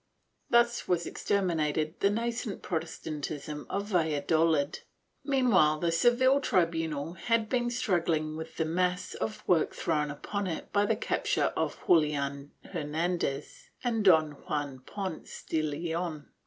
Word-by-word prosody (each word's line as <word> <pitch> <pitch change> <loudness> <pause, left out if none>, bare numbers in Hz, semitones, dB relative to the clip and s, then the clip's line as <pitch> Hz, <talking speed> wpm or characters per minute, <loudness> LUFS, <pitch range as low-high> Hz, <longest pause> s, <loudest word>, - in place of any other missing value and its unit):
^ - - -47 0.5
Thus 235 0 +3
was 175 -1 +1
exterminated 160 -5 0
the 200 - +4
nascent 230 0 -2
Protestantism 155 -3 -4
of 200 +1 -2
Valla 160 -6 +1
dolid. 160 -1 +2 0.4
Meanwhile 240 - +4
the 170 0 +1
Seville 250 +10 +4
tribunal 165 - 0
had 225 +4 0
been 240 -2 +1
struggling 165 -9 0
with 160 +1 -7
the 160 - +1
mass 180 +3 0
of 215 - -5
work 170 -3 +2
thrown 150 -3 0
upon 200 +7 -3
it 165 - -5
by 205 0 +3
the - - +2
capture - - 0
of - - -1
Julian 145 -3 +2 0.2
Hernan 165 +4 -2
dez 165 - -4 0.2
and 230 -3 0
Don 160 -5 +5 0.2
Juan 145 -3 -2
Ponce 190 -5 -6
de 160 - +1
Leon. 160 0 -3
165 Hz, 140 wpm, -29 LUFS, 155-205 Hz, 0.5 s, Don